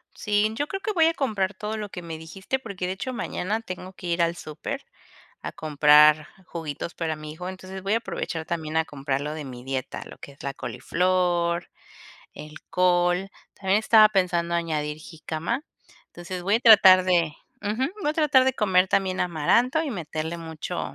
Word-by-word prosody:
Sí, 210 0 +1
yo 290 +5 -2
creo 390 - -4
que 430 +2 -2
voy 330 -4 +4
a 330 - +2
comprar 210 -9 -1
todo 210 +3 -4
lo 210 -1 -5
que 180 -2 -8
me 165 -1 -6
dijiste, 190 +10 -4
porque 200 -7 -5
de 180 - -2
hecho 255 +7 -5
mañana 215 -2 -2
tengo 185 -2 -8
que 180 - -9
ir 170 0 0
al 170 0 +1
super 175 - -6 0.6
a - - -5
comprar 150 0 +5 0.2
juguitos 165 -1 -6
para 160 -2 -2
mi 155 0 -8
hijo, 180 +3 -8
entonces, 190 0 -9
voy 195 +2 -1
a 225 - +4
aprovechar 165 -7 -5
también 160 -2 -2
a 160 - +1
comprar 135 -1 -3
lo 150 +1 -4
de 155 -1 -6
mi 125 -2 -9
dieta, 130 0 -4
lo - - -11
que 140 - -11
es 140 - -16
la 140 0 -4
coliflor, 175 +6 0 0.7
el 150 +1 -10
col, 180 +1 +2 0.3
también 195 +1 +1
estaba 220 -1 +7
pensando 180 -4 0
añadir 155 -3 -2
jícama, 160 - -4 0.4
entonces, 175 +1 -7
voy 200 +3 +2
a - - -3
tratar 195 -5 +8
de 170 -4 +2 0.3
ujú, 215 +6 0 0.2
voy 295 - +1
a - - -2
tratar 300 -4 +4
de 265 - +2
comer 190 -6 +3
también 190 -1 0
amaranto 230 - +2
y 305 - -3
meterle 160 - -4
mucho 160 -2 -5
180 Hz, 190 wpm, -25 LUFS, 160-210 Hz, 0.7 s, tratar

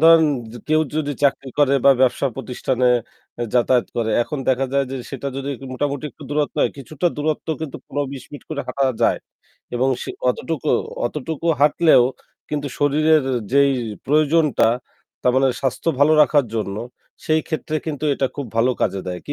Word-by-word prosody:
ধরেন 165 0 +7 0.3
য - - -11
কেউ 155 0 +4 0.2
যদি 145 -2 -1
চাকরি 135 -1 +1
করে 140 -1 +4
বা 140 - +8
ব্যবসা 130 +1 +3
প্রতিষ্ঠানে 130 -1 -1 0.5
এ - - +1
যাতায়াত 125 0 +3
করে। 115 -1 0
এখন 150 +5 -5
দেখা 130 +1 +2
যায় 140 0 +2
যে 135 - -3
সেটা 140 0 -5
যদি 135 0 -4 0.2
মোটামুটি 140 +2 -2
একটু - - -15
দূরত্ব 150 0 0
হয়, - - +3
কিছুটা 150 +5 -3
দূরত্ব 155 +2 -2
কিন্তু 155 -3 -5
১৫-২০ 140 -2 -4
মিনিট 145 - -10
করে 150 -2 -2
হাঁটা 135 -1 +1 0.2
যায়। - - +3 0.6
এবং 130 +2 +2
সে - - -5 0.2
অতটুকু 140 +3 -2 0.4
অতটুকু 155 +5 -4
হাঁটলেও 150 -1 +5 0.5
কিন্তু 145 -1 -2
শরীরের 155 +2 +3 0.3
যেই 140 0 +5 0.4
প্রয়োজনটা 150 -4 +3 0.5
তার 125 - +3
মানে 135 0 +4
স্বাস্থ্য 135 +4 -1
ভালো 150 +2 +6
রাখার 145 -1 +3
জন্য 105 -3 -2 0.5
সেই 155 0 +2
ক্ষেত্রে 155 -1 -2
কিন্তু 155 -2 -3
এটা 135 - 0
খুব 140 -2 -4
ভালো 120 +3 +4
কাজে 95 -1 0
দেয়। 90 -1 -3
কি 145 - -3
140 Hz, 170 wpm, -21 LUFS, 130-150 Hz, 0.6 s, বা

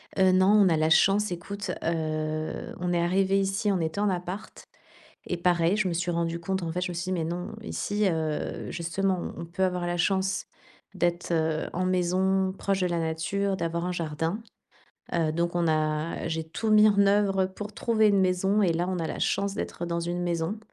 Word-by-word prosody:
Heu, 190 -1 +4
non, 185 +1 +4
on 205 -3 +6
a 160 - +2
la 155 0 +2
chance 195 +5 +4
écoute, 200 +4 -5
heu, 155 -1 -2
on 180 0 -1
est 170 - +2
arrivés 190 +3 +2
ici 195 +2 0
on 190 - +1
était 160 +4 -2
en 205 0 +2
appart 180 +3 -5 0.6
et 180 - -2
pareil, 175 +1 +2
je 215 -2 +1
me - - -1
suis 175 +1 -1
rendue 170 0 -1
compte 190 +2 -2
en 165 - -2
fait 180 - -2
je 180 - -1
me - - -5
suis 170 +1 -3
dis: 185 - -2
«Mais 170 -3 -1
non, 175 +5 -4
ici, 210 -1 -1
heu, 160 -3 -2
justement, 180 +2 -1
on - - -7
on - - -6
peut 180 +3 -1
avoir 180 -1 -1
la 175 0 -1
chance 190 +2 0 0.5
d'être, 175 -1 -1
heu, 160 -1 0
en 185 - -1
maison 185 +1 +1
proche 195 0 -1
de 180 - +2
la 175 -1 -1
nature, 165 +5 -1
d'avoir 170 -1 -2
un 180 - -1
jardin», 165 +3 -2 0.7
heu, 165 -2 +1
donc 170 +2 -1
on 175 -1 +1
a 155 0 0
j'ai 160 0 -2
tout 185 +7 -3
mis 215 0 +7
en 200 -1 +4
œuvre 195 -1 +3
pour 205 +3 -8
trouver 220 0 +2
une 200 -1 +3
maison 190 +3 +2
et 180 -4 +3
là, 170 +2 -1
on 185 -1 -1
a 165 - -1
la - - -5
chance 200 0 0
d'être 175 - -4
dans 170 0 -1
une 175 +1 -2
maison 170 +3 -1
180 Hz, 215 wpm, -27 LUFS, 170-195 Hz, 0.7 s, mis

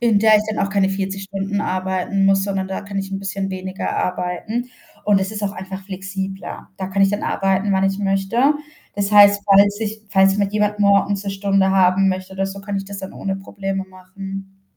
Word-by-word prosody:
in 230 -4 +4
der 215 0 +6
ich 210 - +1
dann 205 -2 0
auch 195 - -4
keine 195 -1 +2
40 195 0 -3
Stunden 195 +1 -3
arbeiten 190 +1 -1
muss, 195 0 +4
sondern 195 -1 -2
da 190 - -3
kann 200 -1 -5
ich 195 0 -4
'n 195 - -2
bisschen 195 0 -3
weniger 185 +1 -4
arbeiten, 180 +7 -2 0.4
und 205 -2 +4
es 190 - -2
ist 210 -1 -5
auch 200 - -1
einfach 190 -1 -7
flexibler. 190 0 -6
Da 190 - -4
kann 195 +1 +1
ich 195 - +4
dann 205 +1 -2
arbeiten, 195 +1 +1
wann 190 0 +2
ich 195 +1 0
möchte. 200 +8 +2 0.4
Das 200 0 -1
heißt, 205 0 +7
falls 200 +1 +5
sich 220 0 -4
falls 195 0 +4
mich 200 -1 0
jemand 210 0 +1
morgens 200 0 +3
'ne 200 - -2
Stunde 195 -1 +1
haben 190 0 +4
möchte 185 0 -3
oder 195 0 -1
so, 195 +1 -7
kann 200 0 -4
ich 195 - -3
das 200 0 -8
dann 190 0 -7
ohne 195 0 -3
Probleme 195 0 -4
machen. 195 +1 -9
195 Hz, 215 wpm, -20 LUFS, 190-200 Hz, 0.4 s, heißt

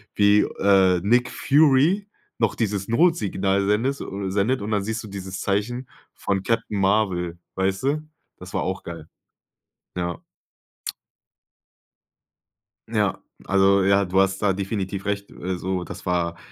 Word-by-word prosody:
wie, 105 0 +5
äh, 95 -2 +3
Nick 120 +4 +3
Fury 155 +7 +3 0.3
noch 115 -3 +1
dieses 100 -4 -1
Notsignal 100 - +2
sendest 120 +7 +1
oder 95 -1 -4
sendet 105 +4 +1
und 110 - -4
dann 100 -2 +1
siehst 110 +2 -3
du 110 - -8
dieses 95 -1 -6
Zeichen 120 +6 -1 0.3
von 100 -1 -1
Captain 115 -3 -1
Marvel, 95 -4 +1 0.2
weißt 95 +3 -1
du? 150 +3 -1 0.3
Das - - -11
war - - 0
auch - - -3
geil. 85 -2 -8 0.9
Ja. 85 -1 -2 2.7
Ja, - - 0 0.3
also, 100 0 +4
ja, 100 +1 +4
du 95 +2 +3
hast 95 0 +1
da 100 - +3
definitiv 100 0 -3
recht, 100 0 -3
äh, 90 0 -4
so, 90 0 -2
das - - -9
war 85 -1 0
100 Hz, 140 wpm, -23 LUFS, 95-110 Hz, 2.7 s, wie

